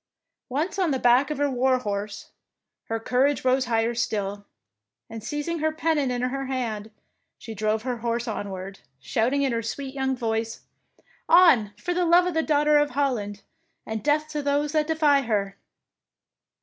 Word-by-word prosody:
Once 310 +10 -2
on 365 -3 +2
the 270 - +1
back 250 +3 +4
of 300 - -3
her 290 0 +1
war 260 -1 +2
horse, 205 -3 -5 0.5
her 225 0 -3
courage 260 +5 +1
rose 255 0 +3
higher 230 -1 +1
still, 205 -3 -2 0.7
and 225 -1 -7
seizing 295 +6 -3
her 315 +1 +1
pennon 315 -3 0
in 245 0 -2
her 270 +1 -2
hand, 225 -5 -3 0.5
she 225 - -8
drove 215 +1 -1
her 250 -1 -2
horse 235 +1 -2
onward, 195 -3 -5 0.2
shouting 245 - 0
in 270 - +1
her 230 -1 -1
sweet 265 +4 -5
young 265 -1 -1
voice, 225 -1 -2 0.4
— - - -34 0.2
On, 325 - +6
for 355 +12 -3
the 360 +1 +1
love 345 +1 +5
of 360 - -1
the 320 - +2
Daughter 300 -1 +3
of 295 0 +2
Holland, 245 -8 -2 0.4
and 220 -1 -4
death 300 +1 +2
to 300 -1 -3
those 285 +1 0
that 305 -1 +1
deny 305 -3 +3
her! 205 -5 -1
255 Hz, 175 wpm, -25 LUFS, 225-295 Hz, 0.7 s, On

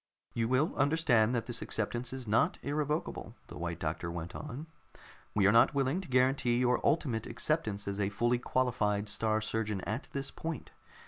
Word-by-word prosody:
"You 115 -1 0
will 130 +6 +2
understand 135 -6 +3
that 115 - -1
this 120 - -3
acceptance 120 +3 -2
is 130 -3 -6
not 135 - +2
irrevocable," 150 +2 -2
the - - -8
White 85 -1 -3
Doctor 85 +2 -2
went 85 0 -5
on. 150 +1 -6 0.7
"We 100 -2 +4
are 100 - +7
not 115 +5 +5
willing 140 +6 +1
to 190 - -9
guarantee 125 -1 +3
your 125 -1 +2
ultimate 125 -7 +1
acceptance 110 -11 -1
as 100 0 -3
a 100 -1 +1
fully 120 +4 +1
qualified 110 -5 0
Star 110 +1 0
Surgeon 105 -2 -2
at 110 +9 -4
this 140 0 -3
point. 165 -1 -5
120 Hz, 175 wpm, -32 LUFS, 105-135 Hz, 0.7 s, are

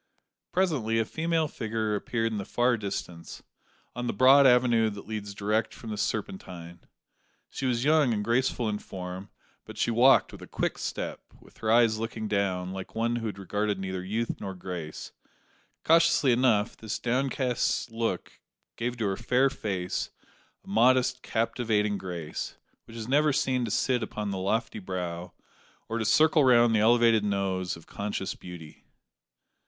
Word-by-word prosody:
Presently, 140 -12 +1
a 115 - +2
female 160 +3 0
figure 110 -4 -2
appeared 115 +2 -1
in 105 - -2
the - - -3
far 120 +4 +1
distance, 95 -5 -6 0.5
on 120 0 -3
the - - -1
broad 135 +2 +7
avenue 120 -3 +4
that 100 -1 -9
leads 105 -2 -5
direct 105 +2 -1
from 115 - -8
the - - -2
Serpentine. 95 -5 -4 0.7
She 135 - -3
was 120 -1 0
young 150 -4 +4
and 105 -2 -1
graceful 120 0 +1
in 105 -1 -2
form; 95 +1 -7 0.3
but - - -11
she 120 - +1
walked 125 +4 +5
with - - -11
a - - -10
quick - - -2
step, - - -4 0.2
with - - -20
her 110 - 0
eyes 115 -2 +4
looking 115 -1 -4
down, 95 -3 -1
like 95 0 -7
one 115 +1 0
who 115 -2 -2
regarded 105 +1 -2
neither 95 -1 -4
youth 110 +5 -3
nor 95 -1 -5
grace. 90 -4 -7 0.7
Curiously 165 -4 +4
enough, 120 -3 +2
this 110 -1 -5
downcast 125 -1 0
look 115 -5 -3 0.4
gave 120 +1 -2
to 115 - -1
her 95 -1 -1
fair 125 +3 +2
face 95 -4 -3 0.5
a - - -23
modest, 125 +4 +3
captivating 110 -3 0
grace, 85 -4 -5 0.3
which 115 - -11
is 110 -1 -6
never 150 +3 +3
seen 130 -3 +1
to - - -4
sit 125 +3 +1
upon 105 -2 -4
the 95 - -3
lofty 110 +4 -1
brow, 90 -2 -5 0.5
or 115 +1 -2
to 110 - -1
circle 155 +6 +4
round 120 -3 +5
the 110 - +3
elevated 115 0 +4
nose, 95 -3 -1
of 85 - -15
conscious 100 -1 -4
beauty. 85 -4 -11
110 Hz, 160 wpm, -28 LUFS, 100-120 Hz, 0.7 s, broad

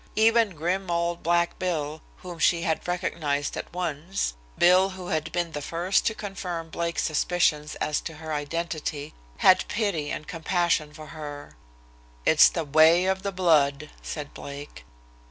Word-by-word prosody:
Even 225 -3 +4
grim 180 +4 -2
old 170 0 -1
"Black 170 +1 +1
Bill," 155 -4 -2 0.2
whom 175 -2 -8
she 170 0 +3
had 160 0 -1
recognized 155 -5 -1
at - - -6
once, 170 - -2 0.2
Bill, 185 +2 +5
who 185 -2 -8
had 160 0 -1
been 175 0 -1
the 150 - -5
first 170 +6 0
to 220 - 0
confirm 180 -6 -5
Blake's 170 +1 -2
suspicions 155 -2 +1
as 150 - -1
to 160 - -7
her 160 0 -6
identity, 150 -1 -3 0.2
had 185 0 +5
pity 200 -9 -1
and 155 - -5
compassion 170 -2 0
for 155 0 -11
her. 145 -2 -8 0.7
"It's 160 - +7
the 165 -2 -3
way 160 +5 +5
of 190 0 0
the 200 0 -2
blood," 150 -6 +2
said 150 -2 -6
Blake. 140 - -9
170 Hz, 155 wpm, -26 LUFS, 150-180 Hz, 0.7 s, It's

